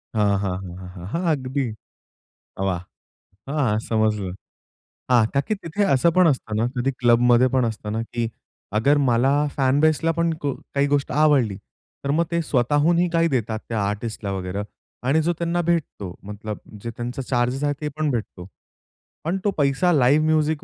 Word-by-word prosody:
हां, 105 -2 +3
हां, 95 -2 -2
हां, 90 -2 -8
हां, 90 -1 -9
हां. 90 -1 -8
हां, 170 - -1
अगदी. 135 0 -2 1.0
वाह! 90 -2 -1 0.7
हां, 135 -8 +1
समजलं. 110 -4 0 0.8
हां. 120 -3 +6
का 140 - +3
की 215 - +2
तिथे 195 +1 -2
असं 170 +6 +3
पण 185 -2 +7
असतं 130 -7 0
ना, 115 - +2
कधी 125 +3 +1
क्लबमध्ये 120 +1 +5
पण 130 -2 +3
असत 110 -2 -4
ना, 115 - -1
की 120 +1 -3 0.6
अगर 140 +6 +4
मला 120 +3 +3 0.3
फॅन 135 0 +3
बेसला 155 +1 +3
पण 170 0 +2
को 140 - +1 0.2
काही 140 0 +3
गोष्ट 140 -1 0
आवडली, 130 -10 +3 0.5
तर 140 - +1
मग 170 - +3
ते 170 0 +1
स्वतःहूनही 150 +6 +2
काही 165 0 +3
देतात 110 -2 -1
त्या 115 -3 -1
आर्टिस्टला 105 -1 -4
वगैरे 95 +1 -3 0.4
आणि 155 +4 +3
जो 170 +2 +1
त्यांना 170 0 0
भेटतो, 160 - -2
मतलब 105 +1 -6 0.3
जे 115 - -4
त्यांचे 125 +2 -4
चार्जेस 125 +2 0
आहे 145 0 +2
ते 150 - -2
पण 155 -1 +1
भेटतो. 105 -7 -4 0.8
पण 170 +4 -1
तो 205 - +3
पैसा 145 +5 +2
लाईव्ह 145 +2 +4
म्युझिक 155 -1 +1
130 Hz, 170 wpm, -23 LUFS, 110-155 Hz, 1.0 s, पण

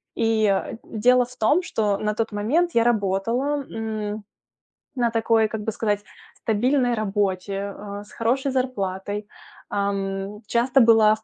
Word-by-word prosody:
И 220 -3 +2 0.2
дело 250 +3 +3
в 250 +1 -15
том, 295 +12 +3
что 210 - 0
на 210 0 -1
тот 225 0 -1
момент 290 +13 +1
я 230 - +4
работала, 235 +7 0
м, 215 -1 -4 0.7
на 240 -2 +2
такой, 225 -1 +3
как 220 -1 -4
бы 220 - -1
сказать, 205 -2 0 0.3
стабильной 245 +3 +1
работе, 200 -2 -1
а, 205 0 -7
с - - -18
хорошей 260 +4 0
зарплатой. 205 -5 -2 0.4
Ам, 200 +1 -2
часто 250 +3 +3
была 220 -2 +6
в 220 - -19
220 Hz, 140 wpm, -23 LUFS, 205-240 Hz, 0.7 s, была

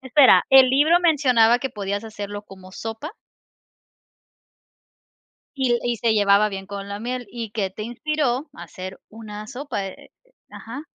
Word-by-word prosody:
Espera, 265 +1 +5
¿el 265 -1 +8
libro 300 +6 +4
mencionaba 255 -9 +4
que 265 -1 -3
podías 200 -2 -4
hacerlo 205 -2 -7
como 190 -2 -14
sopa? 225 - -6 2.4
Y 265 -3 0
l 240 - +3
y 240 -1 0
se 225 0 +1
llevaba 205 0 +4
bien 195 -1 -7
con 200 0 -7
la 200 0 -5
miel, 245 +2 -4
¿y 230 -3 -6
que 205 -2 -2
te 215 - -8
inspiró 265 +3 -2
a - - -10
hacer 185 0 -9
una 215 -1 -9
sopa?, 255 -5 -5
eh, 190 - -11
eh - - -32 0.2
ajá. 255 +6 -8
230 Hz, 160 wpm, -22 LUFS, 205-265 Hz, 2.4 s, el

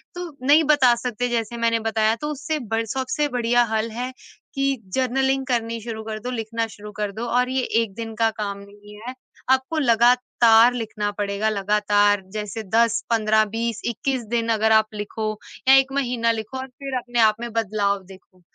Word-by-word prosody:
तो 355 -1 -5 0.2
नहीं 300 +3 +6
बता 270 -5 +5
सकते 245 0 -3
जैसे 235 0 -2
मैंने 230 0 +1
बताया 220 0 +1
तो 300 - -2
उससे 305 +2 -3
ब 225 -3 -2
सबसे 265 +4 -1
बढिया 240 0 +3
हल 220 +1 0
है, 245 +3 -4 0.4
कि 275 0 +1 0.2
जर्नलिंग 265 +1 +1
करनी 230 -2 -1
शुरू 220 -1 -6
कर 215 0 -5
दो, 245 +3 -5
लिखना 230 -1 -2
शुरू 210 -1 -11
कर 210 0 -3
दो 220 +4 -5
और 250 0 +2
ये 260 0 0 0.2
1 220 -4 -4
दिन 225 0 -6
का 225 +1 +2
काम 200 -2 -3
नहीं 205 +1 -14
है। 255 - -4 0.4
आपको 265 +4 +2
लगातार 240 -2 +4
लिखना 220 -3 -3
पड़ेगा 205 +1 -1
लगातार 205 0 +2
जैसे 215 +1 -4
10 230 -1 +3
15 220 -1 +3
20 230 0 -2
21 255 +2 -2
दिन 230 0 -1
अगर 220 0 +2
आप 220 0 +5
लिखो 215 +1 -4 0.4
या 265 - +8
1 270 0 +4
महीना 245 -4 +1
लिखो 225 +3 -5
और 260 0 -5
फिर 270 +1 -7
अपने 240 -1 -3
आप 215 -2 +5
में 235 0 -5
बदलाव 200 -3 0
देखो। 185 -1 -17
230 Hz, 185 wpm, -23 LUFS, 215-250 Hz, 0.4 s, या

